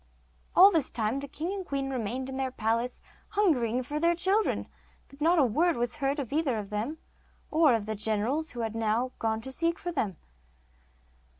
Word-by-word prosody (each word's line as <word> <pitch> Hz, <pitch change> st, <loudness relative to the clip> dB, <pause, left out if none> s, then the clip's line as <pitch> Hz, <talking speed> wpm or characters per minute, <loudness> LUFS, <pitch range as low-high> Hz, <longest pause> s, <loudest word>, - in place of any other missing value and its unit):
All 390 Hz, +3 st, +9 dB
this 320 Hz, -7 st, +1 dB
time 225 Hz, +3 st, -1 dB
the 280 Hz, -, -6 dB
king 325 Hz, +6 st, -4 dB
and 395 Hz, -1 st, -4 dB
queen 275 Hz, -4 st, -3 dB
remained 255 Hz, +1 st, -3 dB
in 265 Hz, 0 st, -5 dB
their 265 Hz, -1 st, -1 dB
palace 230 Hz, +1 st, -1 dB, 0.2 s
hungering 255 Hz, -, +1 dB
for 295 Hz, +4 st, -3 dB
their 340 Hz, +2 st, +3 dB
children, 390 Hz, +5 st, +1 dB, 0.4 s
but 275 Hz, +1 st, -17 dB
not 335 Hz, +3 st, +4 dB
a 290 Hz, -, +5 dB
word 320 Hz, +8 st, +2 dB
was 240 Hz, +4 st, -1 dB
heard 275 Hz, 0 st, 0 dB
of 275 Hz, -3 st, -4 dB
either 290 Hz, -6 st, +1 dB
of 205 Hz, -1 st, -6 dB
them 225 Hz, +10 st, -2 dB, 0.5 s
or 310 Hz, -5 st, +5 dB
of 215 Hz, -2 st, -2 dB
the 220 Hz, -, -2 dB
generals 220 Hz, +9 st, -1 dB
who 240 Hz, -, -4 dB
had 225 Hz, -1 st, -2 dB, 0.5 s
gone 220 Hz, 0 st, 0 dB
to 265 Hz, -, -7 dB
seek 335 Hz, +5 st, 0 dB
for 350 Hz, -, -4 dB
them. 210 Hz, -, -2 dB
270 Hz, 190 wpm, -29 LUFS, 230-320 Hz, 0.5 s, All